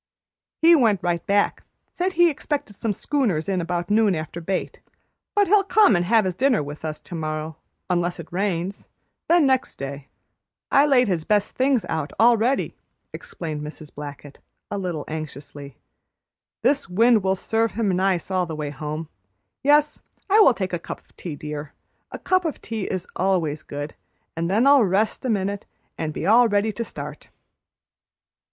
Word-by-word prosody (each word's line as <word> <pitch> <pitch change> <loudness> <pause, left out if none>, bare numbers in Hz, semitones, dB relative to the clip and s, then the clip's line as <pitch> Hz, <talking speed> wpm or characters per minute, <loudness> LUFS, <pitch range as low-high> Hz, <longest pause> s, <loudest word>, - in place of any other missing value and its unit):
"He 335 +1 +8
went 220 - +2
right 175 -1 0
back; 200 0 +2 0.3
said 370 +1 -1
he 345 0 +5
expected 285 -7 -4
some 220 +2 -2
schooners 205 - -1
in 190 -2 0
about 175 +2 -3
noon 210 -3 +4
after 160 +2 -5
bait, 185 +3 -3 0.6
but 410 -1 +4
he'll 405 +1 +5
come 405 - +5
an' 175 - +2
have 220 +1 +3
his 185 -2 -2
dinner 255 - +2
with 145 +2 -8
us 155 -1 -4
tomorrow, 155 -2 -5 0.3
unless 175 -1 0
it 165 0 -10
rains; 190 0 -2 0.4
then 340 -2 +5
next 260 -1 +1
day. 140 0 -7 0.6
I 280 +2 +5
laid 250 -4 +4
his 175 -5 0
best 205 +3 +1
things 260 -3 +2
out 160 -2 -3
all 235 +1 +6
ready," 245 +5 0 0.4
explained 155 -3 -6
Mrs. 150 0 -9
Blackett, 145 -1 -9 0.3
a 200 - -2
little 175 -6 -3
anxiously. 145 -3 -8 0.9
"This 275 -2 +1
wind 225 +4 +4
will 190 0 +1
serve 225 +3 0
him 220 -2 0
nice 185 -1 0
all 185 -2 +1
the 160 - -5
way 150 -1 -4
home. 150 +2 -5 0.5
Yes, 295 +1 +3 0.3
I 415 +2 +5
will 270 - +7
take 190 -4 -3
a 175 - -1
cup - - -7
of - - -33
tea, 165 -5 -6
dear, 150 0 -7 0.4
a - - -5
cup 370 0 +1
of 320 -3 -3
tea 220 -4 -4
is 185 -2 -3
always 170 -5 0
good; 145 +1 -6 0.4
and 165 +1 -2
then 215 +6 +3
I'll 280 -3 +7
rest 205 +6 0
a - - 0
minute 200 -2 -1 0.3
and 160 -1 -3
be 155 - -5
all 230 +5 +6
ready 205 0 +1
to 235 - -4
start." 150 -7 -8
190 Hz, 175 wpm, -23 LUFS, 160-235 Hz, 0.9 s, He